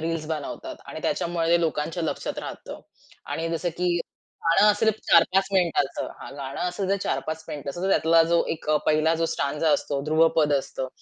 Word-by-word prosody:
reels 165 -1 -2
बनवतात 155 -3 -5
आणि - - -7
त्याच्यामुळे 170 -1 -1
ते 170 0 +4
लोकांच्या 165 +1 -1
लक्षात 160 - -3
राहतं - - -7 0.5
आणि 165 +1 -2
जसं 165 +1 -1
की 180 -1 +1 0.5
गाणं 170 +6 +6
असेल 215 +2 +2 0.2
4-5 185 +3 +5
मिनिटाच 170 -7 +1 0.2
हां, - - -8
गाणं 135 -1 -6
असेल 185 +2 -3
जर 200 - +2
4-5 160 0 -3
मिनिटाच 140 0 -6
तर 185 +2 -2
त्यातला 165 -3 +4
जो 170 - +4
एक 160 - -12
अ, 155 - +4
पहिला 155 +1 +3
जो 165 0 0
स्टांझा 150 +1 0
असतो, 140 -1 -1
ध्रुवपद 155 -1 +3
असतं, 135 -1 -2
165 Hz, 175 wpm, -25 LUFS, 155-175 Hz, 0.5 s, गाणं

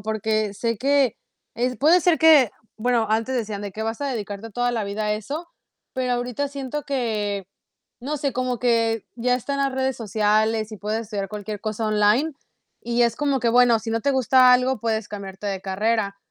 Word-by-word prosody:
Porque 215 0 -1
sé 230 +3 -1
que 275 -1 +2 0.4
es 250 +2 -1
puede 325 +6 +5
ser 350 -1 +3
que 310 -8 +6 0.3
bueno, 230 -1 +1
antes 225 +4 0
decían 215 -4 -3
de 205 -1 -6
que 220 - -5
vas 225 +2 -3
a - - -1
dedicarte 220 -4 -5
toda 245 +3 0
la 230 -3 -2
vida 205 +2 -3
a 210 - +1
eso. 290 - -6 0.5
Pero 255 -1 -1
ahorita 245 +3 -2
siento 280 +1 -5
que, 210 -8 -2 0.5
no 290 +5 -3
sé, 280 -1 -1
como 250 -1 -2
que 230 -2 +1
ya 250 +1 +1
están 280 +3 -3
las 275 -1 +1
redes 265 -1 -1
sociales 215 0 +1
y - - -6
puedes 210 +2 -2
estudiar 205 -3 -4
cualquier 210 0 -6
cosa 215 +1 -3
online 215 +9 +3 0.6
y 240 0 0
es 235 -1 +2
como 280 -3 0
que 235 - +1
bueno, 240 -1 +5
si 225 +1 -8
no 230 0 0
te 280 - +2
gusta 255 -1 +5
algo 255 +1 +2
puedes 220 -2 -1
cambiarte 200 -1 -7
de 195 -2 -2
carrera. 200 +1 -1
230 Hz, 195 wpm, -23 LUFS, 215-255 Hz, 0.6 s, que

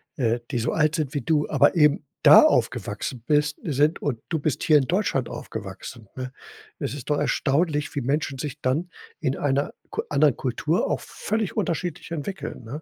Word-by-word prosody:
äh, 120 -3 +1
die 130 - -2
so 115 0 0
alt 155 0 +2
sind 150 -5 -2
wie 145 - -1
du, 150 +4 +1
aber - - +4
eben 150 -2 +4 0.2
da - - +10
aufgewachsen 120 -3 0
bist 150 -1 +2
sind 150 +1 +1
und 130 -6 -2
du 160 - 0
bist 145 -1 -1
hier 155 - +6
in 135 - -2
Deutschland 170 - 0
aufgewachsen, 110 +1 -8
ne? 130 0 -6 0.5
Es 125 - -3
ist 145 +1 -6
doch 145 - +2
erstaunlich, 150 +1 0
wie 145 - -2
Menschen 140 +1 -1
sich 145 +1 -5
dann 150 +7 0 0.3
in 130 - -1
einer 140 0 0 0.2
Ku 435 +1 -1
anderen - - +3
Kultur - - -1
auch - - 0
völlig 215 -2 -3
unterschiedlich 175 0 -2
entwickeln, 170 -2 -5
ne? 135 +8 -7
145 Hz, 185 wpm, -24 LUFS, 130-160 Hz, 0.5 s, da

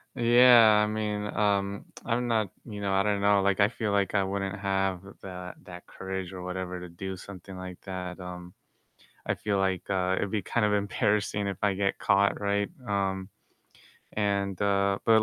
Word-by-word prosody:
Yeah, 120 -3 +7
I - - +1
mean, 105 -1 -2
um, 100 -1 0 0.2
I'm 120 +1 0
not, 110 -4 +1 0.2
you 105 -3 -7
know 100 -1 -1
I 95 0 +3
don't 100 -1 0
know, 100 -1 +4
like, 100 +1 +1
I 100 +1 +5
feel 110 -3 -2
like 100 0 +1
I 100 - +4
wouldn't 100 +1 -2
have 95 -2 0 0.2
that 90 -1 -7
that 90 -1 -10
courage 95 -1 -5
or 90 - -7
whatever 90 0 -4
to 90 -1 -8
do 95 +3 -6
something 95 0 -10
like 90 -1 -8
that, 90 -1 -6
um, 90 -1 -8 0.7
I - - +1
feel 100 -2 -1
like, 95 -1 0
uh, 95 -1 +1
it'd 100 - -2
be 105 - 0
kind 115 +3 0
of 105 - +1
embarrassing 105 0 0
if 95 - -4
I 100 -2 +2
get 95 0 0
caught, 100 0 +2
right? 100 +3 0 0.2
Um, 95 -2 -1 0.8
and, 100 -2 -1
uh 100 -1 +2
but, 110 -1 +6
100 Hz, 185 wpm, -28 LUFS, 95-105 Hz, 0.8 s, Yeah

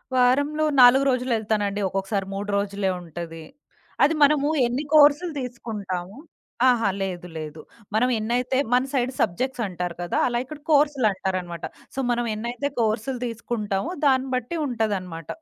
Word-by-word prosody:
వారంలో 285 +5 +3 0.2
4 255 +3 +8
రోజులు 255 0 0
ఎళ్తానండి. 205 -2 -1
ఒక్కొక్కసారి 195 +1 -2
3 200 +1 -4
రోజులే 200 -1 -1
ఉంటది. 165 -1 -8 0.6
అది 295 - +4
మనము 285 0 +4 0.2
ఎన్ని 245 +4 -1
కోర్సులు 300 +3 +6
తీసుకుంటాము? 210 -6 -5 0.5
ఆహా! 230 -4 +2
లేదు 180 -2 -4
లేదు. 155 0 -7 0.3
మనం 250 +3 +3
ఎన్నైతే 245 +4 0 0.2
మన 250 +1 +4
సైడ్ 255 -1 +1
సబ్జెక్ట్స్ 250 +7 -1
అంటారు 180 -2 -4
కదా! 175 - -2
అలా 240 -1 -1
ఇక్కడ 300 +2 -9
కోర్సులటారనమాట. 195 - +1 0.3
సో, 270 - -3
మనం 240 0 0
ఎన్నైతే 240 +6 -3
కోర్సులు 230 +3 0
తీసుకుంటామో 225 - -3
దాన్ని 265 -1 +3
బట్టి 255 +7 -3
ఉంటదనమాట. 190 - -3
230 Hz, 130 wpm, -24 LUFS, 195-260 Hz, 0.6 s, 4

